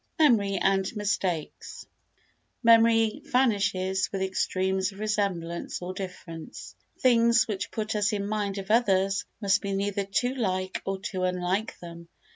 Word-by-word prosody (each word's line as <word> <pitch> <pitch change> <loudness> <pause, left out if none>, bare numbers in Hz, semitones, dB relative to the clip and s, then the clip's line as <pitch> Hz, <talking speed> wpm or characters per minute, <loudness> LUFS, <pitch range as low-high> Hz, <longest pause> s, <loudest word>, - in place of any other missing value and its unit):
Memory 215 -10 +3
and 195 +1 +1
Mistakes 190 -6 -3 0.8
Memory 225 -1 +5
vanishes 200 -6 +1
with 195 -1 -2
extremes 190 0 0
of 195 - -14
resemblance 200 -5 -2
or 180 +1 -5
difference. 165 - -8 0.2
Things 235 -2 +4
which 205 -3 -3
put 215 0 -3
us 210 +1 +1
in 200 -2 -2
mind 205 -2 -2
of 195 +1 -4
others 195 -4 +2 0.2
must 200 0 +2
be 200 -1 -3
neither 200 0 -1
too 245 +6 0
like 185 -6 -2
nor 195 0 -1
too 190 -1 -5
unlike 185 +4 -1
them. 170 -1 -10
195 Hz, 135 wpm, -27 LUFS, 185-215 Hz, 0.8 s, Memory